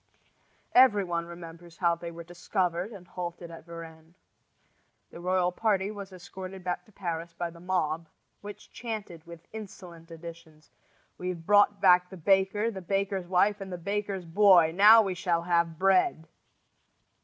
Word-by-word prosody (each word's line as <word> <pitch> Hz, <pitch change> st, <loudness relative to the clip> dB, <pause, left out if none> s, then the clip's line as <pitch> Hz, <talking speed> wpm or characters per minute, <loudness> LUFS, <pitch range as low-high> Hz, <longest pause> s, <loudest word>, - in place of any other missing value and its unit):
Every 245 Hz, -6 st, +6 dB
one 170 Hz, -2 st, -3 dB
remembers 170 Hz, 0 st, -11 dB
how 170 Hz, -2 st, +2 dB
they 170 Hz, 0 st, -6 dB
were 170 Hz, 0 st, -9 dB
discovered 175 Hz, +2 st, -2 dB
and 190 Hz, -5 st, -12 dB
halted 175 Hz, -1 st, -7 dB
at 165 Hz, -1 st, -11 dB
Varennes. 165 Hz, 0 st, -11 dB, 1.0 s
The -, -, -10 dB
royal 180 Hz, 0 st, +1 dB
party 200 Hz, 0 st, 0 dB
was 200 Hz, -2 st, -8 dB
escorted 185 Hz, +1 st, -9 dB
back 180 Hz, 0 st, -3 dB
to 215 Hz, -, -22 dB
Paris 170 Hz, -4 st, -5 dB
by 175 Hz, -1 st, -3 dB
the 170 Hz, -, -15 dB
mob, 165 Hz, -3 st, -1 dB, 0.3 s
which 205 Hz, 0 st, -11 dB
chanted 215 Hz, -8 st, -6 dB
with 170 Hz, 0 st, -12 dB
insolent 185 Hz, -6 st, -10 dB
additions: 165 Hz, -2 st, -12 dB, 0.5 s
"We've 180 Hz, -2 st, -5 dB
brought 205 Hz, 0 st, +4 dB
back 180 Hz, -2 st, +5 dB
the 190 Hz, -, -10 dB
baker, 195 Hz, +5 st, +2 dB
the 190 Hz, -3 st, -7 dB
baker's 195 Hz, 0 st, -2 dB
wife, 200 Hz, +3 st, +2 dB
and 190 Hz, -1 st, -7 dB
the 180 Hz, -, -4 dB
baker's 200 Hz, 0 st, -3 dB
boy! 175 Hz, -2 st, +5 dB
Now 215 Hz, +5 st, +8 dB
we 195 Hz, -2 st, -2 dB
shall 170 Hz, -2 st, -1 dB
have 170 Hz, -2 st, +1 dB
bread!" 185 Hz, -3 st, +2 dB
180 Hz, 155 wpm, -28 LUFS, 170-195 Hz, 1.0 s, Now